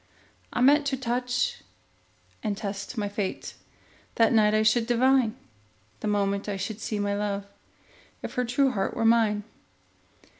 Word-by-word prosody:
I - - -1
meant 285 +3 +5
to 270 -1 0
touch 250 - -1 0.8
and 210 -3 -2
test 200 +3 -5
my 205 -2 -1
fate; 200 -1 -4 0.6
That 230 0 +4
night 215 -1 +4
I 215 - +3
should 225 +1 +3
divine, 250 -1 +3 0.6
The - - -4
moment 200 0 0
I 200 - -2
should 210 +3 -5
see 215 - -3
my 205 0 -1
love, 200 -1 -2 0.8
If - - -5
her 250 -2 0
true 260 +3 +2
heart 195 -4 -2
were 225 - 0
mine. 225 -2 +3
220 Hz, 150 wpm, -26 LUFS, 205-245 Hz, 0.8 s, meant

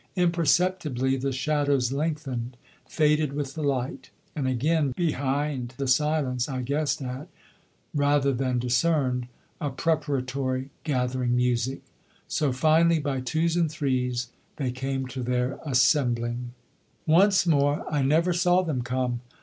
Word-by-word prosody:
Imperceptibly 170 -6 +1
the 135 +1 -2
shadows 140 -1 +1
lengthened, 135 -5 -3 0.3
faded 150 -2 +2
with 140 -2 -3
the 160 - -5
light; 135 -2 -2 0.3
and 140 -3 -1
again 140 +2 +1
behind 140 -5 -1
the 140 -1 -2
silence 135 -2 +1
I 130 -2 -3
guessed 140 +2 -1
at, 130 +3 -6 0.7
rather 145 -1 +2
than 130 0 0
discerned, 125 0 +1 0.3
a 145 - -2
preparatory, 135 -3 -1
gathering 125 -4 0
music. 125 +1 0 0.4
So 150 -3 0
finally, 160 +5 +4
by 140 -4 -2
twos 160 +6 0
and 170 -2 +2
threes, 125 -4 -1 0.3
they 130 -4 -2
came 135 +1 -3
to 130 0 -6
their 125 +1 -1
assembling. 125 -3 +1 0.5
Once 190 +4 +4
more 145 -3 +2
I 150 -2 0
never 160 +6 +2
saw 180 +1 +3
them 150 -8 -2
come. 125 0 -2
135 Hz, 125 wpm, -26 LUFS, 125-155 Hz, 0.7 s, finally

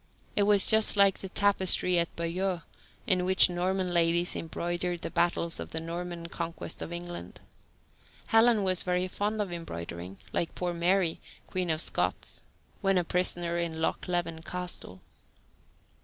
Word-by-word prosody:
It - - +2
was 205 -2 +6
just 220 -1 +6
like 200 -1 +5
the 190 - -6
tapestry 190 -3 +3
at 170 - -2
Bayeux 175 +1 -2 0.4
on 185 -3 +2
which 185 0 +5
Norman 180 +1 -1
ladies 170 +1 +2
embroidered 175 +1 -3
the - - -3
battles 170 -1 0
in - - -5
the 160 - -3
Norman 170 +1 -5
Conquest 170 0 -5
of - - -5
England. 175 - -7 0.9
Helen 225 -1 +4
was 185 -1 +1
very 180 0 0
fond 210 +3 -2
of 185 -3 -7
embroidering, 90 - -7 0.2
like 170 - -1
poor 180 -1 -2
Mary, 175 0 +1 0.3
Queen 185 -2 -3
of 155 0 +1
Scots, - - -1 0.4
when 195 -2 +2
a 180 - +2
prisoner 175 -1 0
in 170 -2 -2
Loch 160 - -1
Leven 175 -2 -2
Castle. 175 - -5
175 Hz, 150 wpm, -29 LUFS, 170-185 Hz, 0.9 s, was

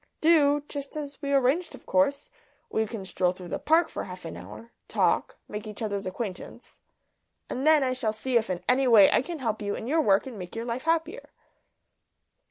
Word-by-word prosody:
"Do? 295 -3 +4
Just 280 +1 -7
as 290 0 -7
we 280 -1 -2
arranged 280 +6 +2
of - - -17
course. 280 - +1 0.4
We 220 0 0
can 205 -3 -6
stroll 180 -1 0
through 180 -1 -10
the - - -3
Park 325 +2 +3
for - - -5
half 180 -1 -9
an 85 - -6
hour 105 +6 -11 0.2
talk - - +1
make 210 +1 -6
each 210 - -8
other's 200 -3 -3
acquaintance. 185 0 -7 0.7
And 265 +4 -1
then 310 -2 +6
I 255 -1 +1
shall 230 -4 -1
see 240 +4 -3
if 230 -2 +3
in 180 -1 -3
any 260 +1 +3
way 215 -5 +7
I - - +4
can 335 +5 -6
help 225 -6 -2
you 205 -1 -2
in - - -6
your 315 +6 +2
work 195 -6 +3
and 245 -6 -8
make 180 +2 -8
your 230 +1 -4
life 245 +3 -4
happier." 330 +7 -1
245 Hz, 205 wpm, -27 LUFS, 200-285 Hz, 0.7 s, way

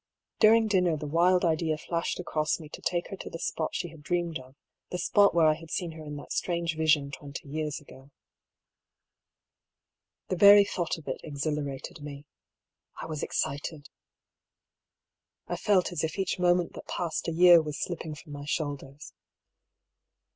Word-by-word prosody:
During 225 +1 +6
dinner 180 -6 +2
the 150 - -6
wild 175 +4 +3
idea 160 -1 +1
flashed 170 +3 -3
across 155 -3 -1
me 155 -2 -10
to - - -10
take 175 -1 -1
her 195 - -5
to - - -7
the - - -6
spot 160 -1 -3
she 175 - -2
had 160 -1 -14
dreamed 170 0 -1
of, 130 +1 -15 0.3
the 180 - -3
spot 200 +1 +4
where 165 -2 +5
I 155 - +6
had 160 +1 -11
seen 175 0 -2
her 160 -1 -10
in 150 -1 -7
that 145 - -7
strange 170 -2 -1
vision 155 -3 +2
twenty 140 +1 -8
years 150 0 -3
ago. 135 -2 -16 2.2
The 185 - -1
very 200 +2 +9
thought 175 -4 -2
of 155 - -14
it 130 - -4
exhilarated 145 0 -4
me. 145 0 -8 0.7
I - - -5
was 155 -2 -5
ex - - -2
cited. 145 +2 -3 1.6
I - - -3
felt 195 -4 +2
as 165 -3 -2
if 160 +3 -2
each 190 -1 -1
moment 175 -1 +2
that - - -10
passed 170 -1 -3
a - - 0
year 175 0 +7
was 150 -2 -5
slipping 165 -3 -4
from 150 +1 -13
my 145 0 -7
shoulders. 145 -1 -4
160 Hz, 170 wpm, -28 LUFS, 150-175 Hz, 2.2 s, very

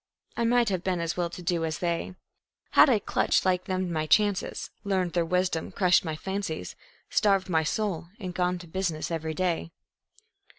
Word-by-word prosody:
I 235 - 0
might 240 -1 +3
have 185 -2 -2
been 185 -2 0
as 170 0 -2
well 175 -1 -1
to 175 +1 -9
do 170 -1 0
as 160 -2 -2
they 170 +1 -2 0.6
Had - - +7
I 240 - +5
clutched 205 - +1
like 185 -1 +1
them 185 -1 -2
my 155 -1 -1
chances, 205 +4 +1
learned 190 -4 0
their 175 - +2
wisdom, 180 -2 0
crushed 180 -2 +3
my 160 -3 -3
fancies, 190 - -4 0.4
Starved 195 -2 +2
my 160 -2 +3
soul 175 +1 -2
and 185 -4 -5
gone 180 0 0
to 175 -1 -11
business 170 -2 -2
every 160 -1 -3
day. 175 -2 -1
180 Hz, 180 wpm, -27 LUFS, 165-190 Hz, 0.6 s, Had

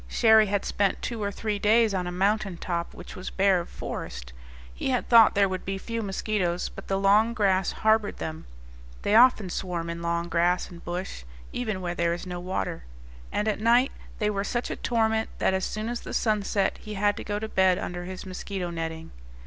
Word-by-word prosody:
Cherrie 220 -2 +5
had 200 0 -1
spent 200 -2 0
two 235 -3 -3
or 200 0 -1
three 210 0 -3
days 220 +1 +4
on 180 -2 -1
a - - -3
mountain 195 0 0
top 170 -1 -3
which - - -10
was 185 - -6
bare 195 -1 +3
of 170 - -6
forest; 60 0 -6 0.4
he - - -3
had 250 -2 0
thought 230 -2 +7
there 200 0 +4
would 185 -1 -4
be 195 0 -3
few 230 +3 -4
mosquitoes, 195 -3 -1
but - - -11
the 195 - 0
long 210 +4 +4
grass 195 -4 +2
harbored 220 -1 +1
them 160 0 -6 0.6
(they 205 - +1
often 230 -3 +6
swarm 170 -3 -3
in 170 0 -6
long 170 0 -1
grass 175 +2 +1
and 170 -1 -12
bush, 175 - -5 0.3
even 215 -6 -2
where 175 -1 -2
there 170 0 0
is 175 - -8
no 180 -1 -5
water), 180 - -3 0.5
and 210 - -1
at 215 - 0
night 240 +4 +4 0.3
they 210 -1 +1
were 200 -1 -1
such 240 +4 -2
a - - -2
torment 220 -1 0
that - - +2
as 190 0 0
soon 215 +1 -4
as 240 0 -2
the - - -6
sun 215 -2 +2
set 195 0 0
he 215 -1 -7
had 205 +1 +2
to - - -6
go 205 0 -2
to 220 +1 -3
bed 190 -3 +3
under 175 0 -5
his 185 +1 -7
mosquito 185 -1 -4
netting. 165 -1 -5
195 Hz, 215 wpm, -26 LUFS, 180-215 Hz, 0.6 s, thought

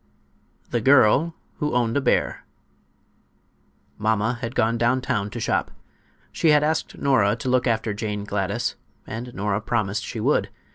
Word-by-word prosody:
THE 120 - 0
GIRL 140 +6 +4 0.2
WHO 150 -3 -1
OWNED 120 0 +1
A - - +1
BEAR - - 0 1.6
Mamma 110 +2 0
had 115 0 -4
gone 115 +1 +2
down 120 +3 +2
town 125 -6 -2
to 120 - -6
shop. - - 0 0.6
She 165 - +1
had 150 -1 +5
asked 160 +1 -1
Nora 115 -7 +3
to 130 +1 -4
look 130 0 +2
after 110 -2 0
Jane 105 -1 -3
Gladys, 100 +3 -2 0.3
and 120 +3 -6
Nora 100 +1 -1
promised 105 -2 -1
she - - -5
would. - - +1
115 Hz, 150 wpm, -23 LUFS, 105-130 Hz, 1.6 s, had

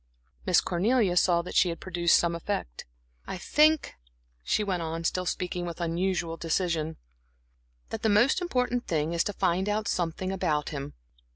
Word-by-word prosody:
Miss - - +5
Cornelia 200 +1 +1
saw 175 -1 +3
that - - -7
she 180 - +4
had 165 - -5
produced 175 -2 +2
some 170 0 +1
effect. 170 - -4 0.4
"I - - -4
think," 305 - +3 0.5
she 210 - +1
went 185 -4 -1
on, 165 0 -4
still 180 +2 -1
speaking 180 0 -2
with 170 -1 -6
unusual 170 0 -1
decision, 165 -1 -1 0.9
"that - - -4
the 220 - +2
most 235 - +4
important 250 -7 -1
thing 160 0 0
is 170 - +2
to 205 - -2
find 185 +2 0
out 210 0 -1
something 180 +1 -1
about 160 -6 -1
him. 140 -2 -6
175 Hz, 165 wpm, -28 LUFS, 165-205 Hz, 0.9 s, Miss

